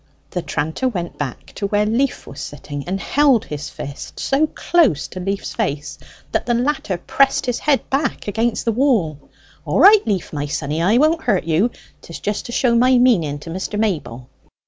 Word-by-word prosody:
the 180 - -2
tranter 160 - -2
went 175 -7 -4
back 135 -4 -5
to 200 - -3
where 205 +1 +1
Leaf 245 +5 0
was 135 0 -9
sitting, 145 0 -6
and 190 +2 -2
held 275 -1 +3
his 150 0 -6
fist 140 0 -8
so 280 +3 +2
close 300 - +2
to 185 - -8
Leaf's 195 +2 -3
face 145 +1 -3 0.3
that - - -1
the 240 - +2
latter 245 -7 -1
pressed 270 +9 +2
his 245 -1 -1
head 290 -2 +1
back 270 -3 -1
against 225 +3 -1
the 230 - +2
wall: 220 - +1 0.4
"All - - 0
right, 415 +1 +8
Leaf, 195 -7 -1
my 145 -1 -2
sonny, 150 +2 -2
I 200 +7 +3
won't 315 +4 +3
hurt 205 -7 +2
you; 165 +8 +2 0.3
'tis 165 - -9
just 210 0 -3
to - - -7
show 240 0 +2
my 250 +2 +5
meaning 185 - +3
to 165 - -8
Mr. 190 +4 -4
Mayble. 150 - -2
205 Hz, 190 wpm, -20 LUFS, 155-255 Hz, 0.4 s, right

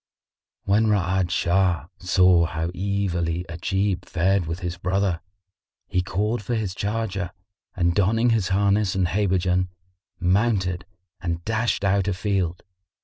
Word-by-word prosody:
When 105 +3 +3
Ra'ad 95 -3 +1
Shah 90 -2 +1
saw 90 -2 +4
how 80 0 -3
evilly 90 -3 -1
Ajib 95 +2 -1
fared 95 +1 +1
with 80 +3 -4
his 90 -1 -3
brother, 90 -1 0 0.7
he 90 - +1
called 105 +6 -1
for 120 +4 -2
his 105 -5 -2
charger 100 -3 -2 0.5
and 85 -1 +2
donning 115 +5 +3
his 110 -5 +1
harness 100 +1 +2
and 95 -2 +2
habergeon, 90 -2 +1 0.5
mounted 95 -2 +1 0.4
and 85 -2 -3
dashed 110 -1 0
out 100 0 +2
a 100 - 0
field. 95 -3 -1
95 Hz, 130 wpm, -24 LUFS, 90-100 Hz, 0.7 s, saw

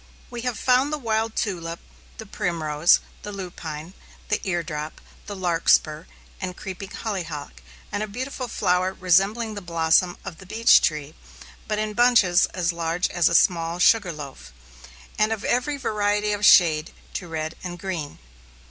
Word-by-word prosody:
We 240 -1 -5
have 245 -2 -2
found 255 +3 +2
the 305 - -1
wild 225 -3 -1
tulip, 170 -6 -3 0.4
the 220 - -8
primrose, 170 -6 +2 0.2
the 210 - -7
lupine, 175 -4 -7 0.4
the 210 - +1
eardrop, 160 -4 -3 0.3
the 205 - -5
larkspur, 165 -3 +2 0.3
and 180 -2 -4
creeping 190 0 -7
hollyhock, 170 -11 -5 0.3
and 205 - -2
a 215 - -2
beautiful 255 +4 -5
flower 185 -3 0
resembling 195 +5 +2
the 205 - -6
blossom 170 +1 +2
of 165 - -8
the 190 - -13
beech 225 +4 +5
tree, 150 -1 -1 0.5
but 215 - -1
in 215 0 -2
bunches 225 -7 +4
as 175 -2 -1
large 170 +1 -1
as 175 -2 +2
a 170 - 0
small 170 -1 +3
sugar 185 0 +4
loaf, 140 - -9 0.7
and 215 +1 +3
of 220 -2 -3
every 250 +4 0
variety 210 -4 0
of 205 0 -4
shade, 160 -3 +5 0.2
to 180 - -5
red 160 0 -4
and 175 -1 -5
green. 170 -5 -5
185 Hz, 155 wpm, -24 LUFS, 165-215 Hz, 0.7 s, beech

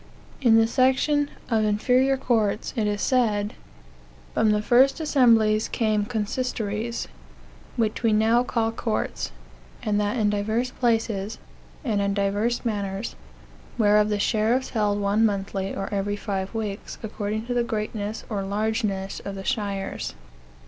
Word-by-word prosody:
In 230 -4 +6
the 225 - +5
section 265 +4 +2
" - - -23
Of 220 -1 +3
Inferior 250 +6 +3
Courts," 220 -5 0
it 220 -3 +1
is 205 0 -1
said: 215 -5 +1 0.8
"From 220 - +3
the 210 0 +2
first 260 +7 +4
assemblies 230 -8 +4
came 215 -3 0
consistories, 225 -1 -2 0.7
which 220 -3 0
we 230 -2 +3
now 220 +3 +4
call 230 -2 0
courts, 225 -1 -2 0.5
and 210 -1 +1
that 205 +4 -1
in 210 -2 +2
divers 220 +5 -1
places, 225 -4 0 0.5
and 210 -5 +1
in 200 0 0
divers 205 +5 0
manners: 200 -1 -2 0.6
whereof 210 -1 +4
the 210 - +1
sheriffs 225 +5 +1
held 205 -3 +1
one 205 +2 +2
monthly, 195 -2 -1
or 195 - -3
every 200 +1 -1
five 200 0 -4
weeks 210 -3 -4
according 215 0 -3
to 245 - -2
the 240 -1 +2
greatness 215 -1 -3
or 205 -3 -2
largeness 200 -1 -1
of 200 - -6
the 195 0 -7
shires. 200 -6 -2
215 Hz, 140 wpm, -25 LUFS, 205-235 Hz, 0.8 s, In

